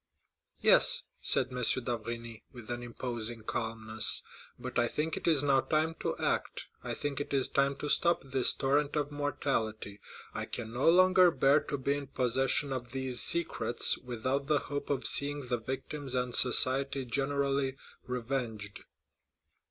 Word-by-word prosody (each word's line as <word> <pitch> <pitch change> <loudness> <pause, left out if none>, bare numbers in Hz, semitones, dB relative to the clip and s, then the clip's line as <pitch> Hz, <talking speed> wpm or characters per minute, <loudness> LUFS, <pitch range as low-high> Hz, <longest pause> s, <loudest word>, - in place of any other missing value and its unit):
"Yes," - - +5 0.2
said - - +1
M. 125 - -4 0.2
d'Avrigny, 115 -1 -5
with 120 -2 -10
an 120 0 -4
imposing 120 -2 -4
calmness, 110 -1 -1 0.3
"but - - -4
I 120 - +2
think 155 +6 -2
it - - -5
is 155 -4 +3
now 140 -2 +3
time 155 +3 0
to - - -3
act. - - -2 0.2
I - - -4
think 145 -1 -3
it 145 - -3
is 135 - +1
time 140 0 +1
to 150 - -5
stop 170 +3 +2
this 135 -1 +1
torrent 145 +2 0
of 150 -1 -1
mortality. 115 -8 -3 0.3
I - - -3
can 115 -1 -4
no 130 +6 +3
longer 185 +1 +6
bear 140 -1 +3
to 145 - -3
be 140 +1 0
in 145 -1 -6
possession 135 +2 +2
of 125 -1 -6
these 130 -2 -2
secrets 170 -7 +1
without 130 +3 -3
the 150 -1 +3
hope 145 0 -4
of 135 -2 -1
seeing 145 -1 +3
the 120 -2 0
victims 135 +3 -5
and 125 -1 -1
society 135 +2 +4
generally 135 +1 0 0.3
revenged." 120 -5 -4
135 Hz, 155 wpm, -31 LUFS, 120-145 Hz, 0.3 s, longer